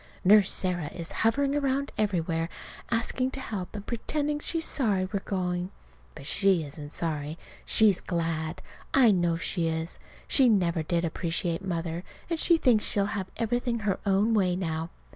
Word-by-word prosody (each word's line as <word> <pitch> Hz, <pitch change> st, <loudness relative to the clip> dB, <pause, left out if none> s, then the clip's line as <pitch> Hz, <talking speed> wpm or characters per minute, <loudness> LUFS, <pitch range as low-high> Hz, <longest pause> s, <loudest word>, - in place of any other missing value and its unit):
Nurse 205 Hz, 0 st, +6 dB
Sarah 180 Hz, -4 st, 0 dB
is 165 Hz, -1 st, -4 dB
hovering 275 Hz, +5 st, +1 dB
around 280 Hz, 0 st, 0 dB
everywhere, 170 Hz, -5 st, 0 dB, 0.4 s
asking 240 Hz, +2 st, 0 dB
to -, -, -4 dB
help, 210 Hz, -7 st, -5 dB
and 205 Hz, -1 st, -6 dB
pretending 295 Hz, +5 st, -2 dB
she's 325 Hz, +2 st, 0 dB
sorry 205 Hz, -9 st, +1 dB
we're 200 Hz, -, 0 dB
going. 180 Hz, -2 st, -2 dB, 0.5 s
But -, -, -9 dB
she 190 Hz, +1 st, +3 dB
isn't 145 Hz, 0 st, -8 dB
sorry. 155 Hz, -2 st, -3 dB, 0.3 s
She's 210 Hz, -4 st, +4 dB
glad. 165 Hz, -1 st, -2 dB, 0.3 s
I 250 Hz, -5 st, +7 dB
know 175 Hz, -3 st, +2 dB
she 165 Hz, 0 st, -1 dB
is. 160 Hz, +1 st, -3 dB, 0.3 s
She 260 Hz, -3 st, +5 dB
never 175 Hz, -6 st, +2 dB
did 170 Hz, +2 st, 0 dB
appreciate 170 Hz, +2 st, -2 dB
Mother, 170 Hz, -2 st, -3 dB, 0.3 s
and 330 Hz, -, 0 dB
she 340 Hz, 0 st, +5 dB
thinks 245 Hz, -8 st, +3 dB
she'll 200 Hz, -1 st, +2 dB
have 190 Hz, -3 st, -3 dB
everything 235 Hz, 0 st, -1 dB
her 200 Hz, -2 st, 0 dB
own 200 Hz, +3 st, +2 dB
way 185 Hz, -4 st, +2 dB
now. 165 Hz, -2 st, -3 dB
190 Hz, 160 wpm, -28 LUFS, 170-230 Hz, 0.5 s, I